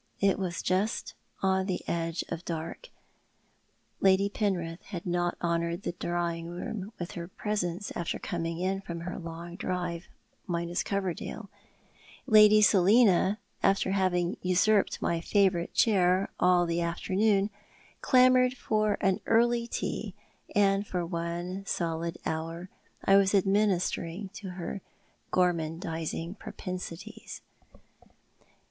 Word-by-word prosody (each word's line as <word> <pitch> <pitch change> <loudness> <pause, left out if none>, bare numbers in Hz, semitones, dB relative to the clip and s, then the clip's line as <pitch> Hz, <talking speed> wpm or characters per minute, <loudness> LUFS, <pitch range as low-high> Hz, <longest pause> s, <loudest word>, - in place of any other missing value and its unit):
It 195 -1 +2
was 180 -3 -3
just 195 +5 0 0.3
on 190 0 +2
the 185 - -3
edge 165 0 -1
of 165 - -5
dark. 165 - -5 1.1
Lady 195 +1 +4
Penrith 180 -5 -2
had 180 -4 -7
not 175 -1 0
honoured 170 +2 -1
the - - -1
drawing 170 -1 -2
room 195 +4 -5
with 175 0 -5
her 170 0 -6
presence 195 -1 -3
after 170 - -2
coming 165 -1 -3
in 190 +2 -1
from 170 -3 -6
her 180 +2 -5
long 170 +1 -7
drive, 175 -3 -3 0.4
minus 170 -1 -1
Coverdale, 195 +1 -3 0.7
Lady 215 -3 +7
Selina, 200 0 +5 0.2
after 195 -1 +2
having 185 -2 +1
usurped 185 +3 +2
my 170 -1 0
favourite 185 -2 +1
chair 190 -3 +3
all 180 -1 +4
the 170 0 -1
afternoon, 195 +4 +1 0.5
clamoured 255 -1 +5
for 215 -2 +1
an 190 -1 +2
early 235 +1 +3
tea, - - -4 0.4
and 200 0 +3
for 180 -2 -2
one 170 +2 -4
solid 165 -1 -2
hour 165 +3 -4 0.4
I 195 - +6
was 195 0 +3
administering 195 -2 +1
to 195 0 -8
her 180 +2 -5 0.5
gormandising 165 0 -1
propensities. 185 +2 -7
185 Hz, 115 wpm, -29 LUFS, 170-200 Hz, 1.1 s, Lady